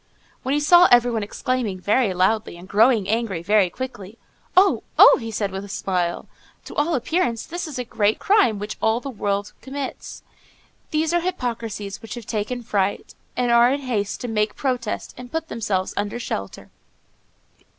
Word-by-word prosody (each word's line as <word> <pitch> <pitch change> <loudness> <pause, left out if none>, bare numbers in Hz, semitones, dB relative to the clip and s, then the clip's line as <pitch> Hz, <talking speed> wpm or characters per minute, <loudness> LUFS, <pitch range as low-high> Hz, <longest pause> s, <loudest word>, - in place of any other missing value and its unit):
When 265 +1 -1
he - - +2
saw 350 +4 +7
everyone 240 -2 +4
exclaiming 210 -1 -2
very 210 +3 +2
loudly, 185 +1 0
and 175 +2 -12
growing 215 0 +3
angry 215 -6 -1
very 205 0 +3
quickly, 225 -2 -7 0.4
"Oh! 390 +1 +5 0.2
oh!" - - +8
he 225 - -5
said, 205 -3 -2
with 190 +1 -5
a 200 - -10
smile; 180 -3 -2 0.4
"to - - -9
all 305 +3 +1
appearance, 250 -2 -1
this 350 0 -5
is 295 - -7
a 250 - -2
great 215 -2 +1
crime 390 - +3
which 210 +1 -6
all 220 +1 +2
the 275 +2 -6
world 205 -2 -2
commits. 275 0 -6 0.7
These 315 +1 0
are 345 - +2
hypocrisies 230 - -4
which 225 - -7
have 240 -3 -8
taken 230 +3 -3
fright, 200 -2 -1 0.2
and 245 -1 +1
are 235 +1 +6
in 280 +1 -1
haste 215 -6 -2
to 245 - -4
make 210 -2 0
protest 250 -5 -3
and 250 - -8
to - - -31
put 325 0 -3
themselves 200 -5 -2
under 205 +3 -3
shelter." 100 - -6
225 Hz, 175 wpm, -22 LUFS, 205-260 Hz, 0.7 s, oh